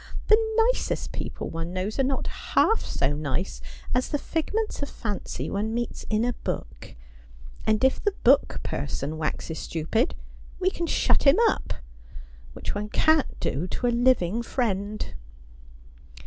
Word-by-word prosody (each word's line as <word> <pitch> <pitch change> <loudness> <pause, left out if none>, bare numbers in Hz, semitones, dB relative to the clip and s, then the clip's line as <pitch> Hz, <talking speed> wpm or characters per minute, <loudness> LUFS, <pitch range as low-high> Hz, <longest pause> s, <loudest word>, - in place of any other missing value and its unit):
' - - -8
The 440 0 +4 0.2
nicest - - -3
people - - -4
one 165 +2 -4
knows 190 +6 -2
are - - +5
not 265 0 0 0.3
half 445 - +5
so 140 +1 0
nice 150 +5 -2 0.3
as 250 +1 +1
the 290 - +1
figments 410 +9 -2
of 285 - -3
fancy 210 -4 -4
one 215 +3 -1
meets 240 0 -3
in 215 +1 +2
a 245 - +1
book; - - -6 0.7
and 215 +2 +3
if 265 - +3
the 410 -2 +1
book 270 +3 +4
person 145 +2 -3
waxes 160 +1 -3
stupid, 195 - 0 0.4
we 375 0 +2
can 340 -2 -3
shut - - +3
him 275 - +7
up - - -1 0.4
— - - -16
which - - -4
one 210 +1 -3
cant 315 +4 +3
do 150 +8 -1
to 245 - -3
a - - +4
living 235 -4 +3
friend.' 215 -4 -2
220 Hz, 155 wpm, -26 LUFS, 165-275 Hz, 0.7 s, him